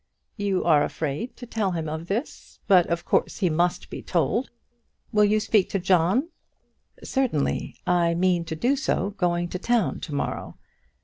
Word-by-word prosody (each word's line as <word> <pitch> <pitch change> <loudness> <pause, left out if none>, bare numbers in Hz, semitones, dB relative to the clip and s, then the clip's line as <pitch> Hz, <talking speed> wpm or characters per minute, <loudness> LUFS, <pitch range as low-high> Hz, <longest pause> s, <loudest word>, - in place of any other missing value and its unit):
"You 200 -3 0
are 155 -4 +4
afraid 155 - -3
to 245 - -8
tell 215 -5 -1
him 165 -2 -3
of 160 +2 -5
this; 220 +9 -4
but 180 -3 +5
of 170 0 -2
course - - +1
he 185 -5 +1
must 175 +3 0
be - - -6
told. 180 - 0 0.6
Will 210 -2 +4
you 210 +1 +3
speak 215 -2 +2
to 195 - -1
John?" 185 - +2 0.7
"Certainly; 255 - -1
I 170 -1 +2
meant 175 -1 +1
to 160 - -3
do 245 - +1
so 205 - -1
going 175 -3 0
to 185 - -4
town 235 -1 +1
to 150 - -6
morrow." - - -3
180 Hz, 170 wpm, -25 LUFS, 170-215 Hz, 0.7 s, but